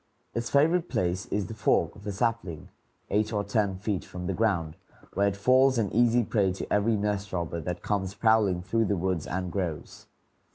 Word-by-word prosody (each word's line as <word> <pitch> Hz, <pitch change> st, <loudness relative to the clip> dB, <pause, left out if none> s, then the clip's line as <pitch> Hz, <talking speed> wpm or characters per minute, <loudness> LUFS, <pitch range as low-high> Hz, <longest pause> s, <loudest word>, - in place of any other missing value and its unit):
Its 115 Hz, 0 st, -2 dB
favorite 165 Hz, +5 st, +3 dB
place 90 Hz, +2 st, -1 dB
is 100 Hz, -1 st, -1 dB
the 110 Hz, -, -7 dB
fork 110 Hz, -, +1 dB
of 100 Hz, +1 st, -11 dB
a -, -, -1 dB
sapling, 100 Hz, -6 st, -2 dB, 0.4 s
eight 105 Hz, +1 st, +1 dB
or 105 Hz, -2 st, 0 dB
ten 100 Hz, -1 st, 0 dB
feet 100 Hz, -1 st, -2 dB
from 90 Hz, 0 st, -7 dB
the 95 Hz, -, -1 dB
ground, 90 Hz, -7 st, 0 dB, 0.4 s
where 100 Hz, 0 st, +2 dB
it 100 Hz, -, -1 dB
falls 130 Hz, +4 st, +4 dB
an 105 Hz, -4 st, 0 dB
easy 120 Hz, +2 st, +4 dB
prey 100 Hz, -3 st, +1 dB
to 95 Hz, -, -5 dB
every 105 Hz, +2 st, +3 dB
nest 105 Hz, -1 st, -2 dB
robber 85 Hz, -2 st, -3 dB
that 90 Hz, +3 st, -5 dB
comes 100 Hz, -2 st, -1 dB
prowling 105 Hz, -6 st, +3 dB
through 115 Hz, +5 st, +1 dB
the 100 Hz, -1 st, 0 dB
woods 90 Hz, -2 st, -1 dB
and 90 Hz, -1 st, -3 dB
groves. 85 Hz, -6 st, -4 dB
100 Hz, 195 wpm, -28 LUFS, 95-110 Hz, 0.4 s, falls